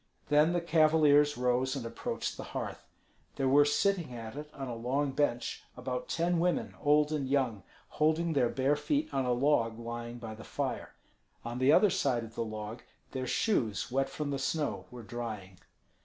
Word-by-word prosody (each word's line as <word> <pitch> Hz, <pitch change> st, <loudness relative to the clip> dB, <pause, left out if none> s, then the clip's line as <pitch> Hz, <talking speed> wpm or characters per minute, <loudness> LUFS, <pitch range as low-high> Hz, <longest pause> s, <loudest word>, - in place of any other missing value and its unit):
Then 150 Hz, +3 st, +4 dB
the 175 Hz, -, +1 dB
cavaliers 155 Hz, -3 st, +4 dB
rose 125 Hz, +2 st, +1 dB
and 130 Hz, -4 st, -4 dB
approached 115 Hz, -, -4 dB
the -, -, -7 dB
hearth. -, -, -5 dB, 0.5 s
There 135 Hz, -, 0 dB
were 145 Hz, +2 st, +6 dB
sitting 170 Hz, -2 st, +1 dB
at 115 Hz, +1 st, -7 dB
it, 150 Hz, +1 st, -7 dB
on 135 Hz, -2 st, -6 dB
a 120 Hz, -, -4 dB
long 135 Hz, +5 st, -1 dB
bench, 125 Hz, -4 st, -1 dB, 0.2 s
about 125 Hz, 0 st, -4 dB
ten 170 Hz, +1 st, +1 dB
women, 175 Hz, +1 st, 0 dB
old 150 Hz, 0 st, +4 dB
and 140 Hz, -4 st, -1 dB
young, 130 Hz, -7 st, +1 dB, 0.3 s
holding 160 Hz, +2 st, +1 dB
their 125 Hz, -5 st, +3 dB
bare 135 Hz, +3 st, +1 dB
feet 290 Hz, -, -1 dB
on 135 Hz, -, +1 dB
a 125 Hz, -, +1 dB
log 120 Hz, -3 st, +2 dB
lying 120 Hz, 0 st, -6 dB
by 115 Hz, -2 st, -7 dB
the 110 Hz, +1 st, -10 dB
fire. -, -, -4 dB, 0.5 s
On 120 Hz, +1 st, -4 dB
the 130 Hz, +2 st, +5 dB
other 200 Hz, +5 st, +6 dB
side 125 Hz, -4 st, +1 dB
of 115 Hz, 0 st, -10 dB
the 115 Hz, -, -2 dB
log 110 Hz, +1 st, -6 dB, 0.3 s
their 130 Hz, -1 st, -3 dB
shoes 120 Hz, -, 0 dB
wet 135 Hz, +1 st, +1 dB
from 150 Hz, -2 st, -4 dB
the 140 Hz, -, -2 dB
snow 150 Hz, +2 st, -1 dB
were 125 Hz, -1 st, -10 dB
drying. 105 Hz, -6 st, -6 dB
135 Hz, 185 wpm, -31 LUFS, 120-150 Hz, 0.5 s, were